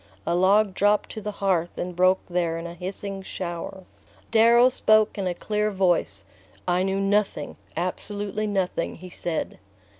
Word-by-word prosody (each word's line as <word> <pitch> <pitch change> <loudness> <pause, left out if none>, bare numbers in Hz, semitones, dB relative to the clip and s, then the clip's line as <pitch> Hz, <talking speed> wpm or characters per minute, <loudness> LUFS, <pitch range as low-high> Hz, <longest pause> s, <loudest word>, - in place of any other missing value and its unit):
A 170 - 0
log 195 +3 +4
dropped 205 +2 +2
to 215 - -6
the 210 - -4
hearth 185 -4 0
and 180 0 -4
broke 185 +1 +3
there 175 -2 -1
in 165 - -6
a 170 - -6
hissing 195 +2 -5
shower. 185 0 -6 0.5
Darrow 235 +2 +6
spoke 215 -4 +3
in 195 -2 -2
a 175 - -1
clear 210 +2 -1
voice. 175 - 0 0.4
"I 180 0 +2
knew 195 +1 0
nothing, 195 -6 0 0.2
absolutely 205 +4 -3
nothing," 190 -4 -1
he 180 +1 -11
said. 170 -2 -3
190 Hz, 155 wpm, -25 LUFS, 175-205 Hz, 0.5 s, Darrow